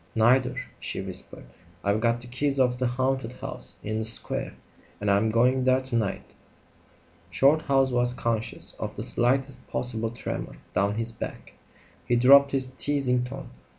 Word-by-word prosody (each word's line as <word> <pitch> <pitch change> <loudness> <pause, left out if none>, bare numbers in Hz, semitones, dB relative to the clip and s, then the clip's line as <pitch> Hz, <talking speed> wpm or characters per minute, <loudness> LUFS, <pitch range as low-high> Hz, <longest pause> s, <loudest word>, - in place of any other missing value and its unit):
"Neither," 125 +3 +4 0.2
she - - -3
whispered. - - -5 0.4
"I've 100 +2 +1
got 115 0 +1
the - - -9
keys 135 +3 -1
of 125 -1 +2
the 130 - +1
haunted 130 0 -1
house - - -7
in 110 +1 -2
the - - -1
square 115 +1 -1 0.4
and 100 0 +1
I'm 100 +3 +3
going 125 +3 +3
there 130 0 +3
to 130 -2 -5
night." 110 -4 -2 1.0
Shorthouse 135 - +3
was 120 0 +3
conscious 115 -2 -3
of - - -4
the - - -4
slightest 130 +1 0
possible 115 -2 -2
tremor 120 - -5 0.2
down 100 +1 +1
his 115 +1 +1
back. 115 - -7 0.5
He 120 - +3
dropped 140 +3 +7
his 135 -1 +2
teasing 130 -2 0
tone. 130 +2 -7
125 Hz, 155 wpm, -26 LUFS, 115-130 Hz, 1.0 s, dropped